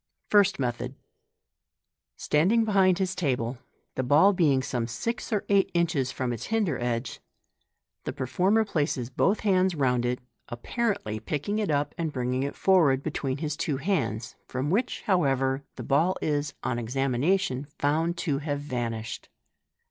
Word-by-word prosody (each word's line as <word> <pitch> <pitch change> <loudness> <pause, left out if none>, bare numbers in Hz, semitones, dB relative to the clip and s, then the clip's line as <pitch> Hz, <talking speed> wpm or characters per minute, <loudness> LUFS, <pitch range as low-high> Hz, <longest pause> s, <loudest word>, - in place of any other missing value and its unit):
— - - -51
First 200 -1 +5
Method. 125 0 -3 1.2
Standing 200 +10 +2
behind 190 -4 +4
his 190 -1 0
table, 130 -8 -1 0.3
the - - -1
ball 150 +10 +5
being 145 -8 +3
some 120 -3 -2
six 230 - -4
or 210 -3 0
eight 200 -1 +3
inches 160 -7 +1
from 125 -3 -2
its 115 - -6
hinder 210 - 0
edge, 120 0 -2 0.9
the - - -2
performer 190 - +1
places 145 - -1
both 195 - +1
bands 185 -3 +3
round 125 -4 +1
it, 125 +1 0 0.3
apparently 120 - -2
picking 155 - -2
it 210 -5 -1
up 145 -1 0
and 165 -2 -1
bringing 125 -1 -1
it 140 +1 -3
forward 155 -9 +3
between 140 -3 -2
his 150 0 -3
two 150 -3 -1
hands, 125 - -1
from 130 +4 -2
which, 235 +6 0
however, 135 - +1
the - - -6
ball 165 +7 +2
is, 145 -1 -1
on 120 - -1
examination, 135 +5 0
found 160 +4 +1
to 145 -5 -1
have 145 -1 -2
vanished. 120 -5 -4
145 Hz, 150 wpm, -27 LUFS, 130-185 Hz, 1.2 s, First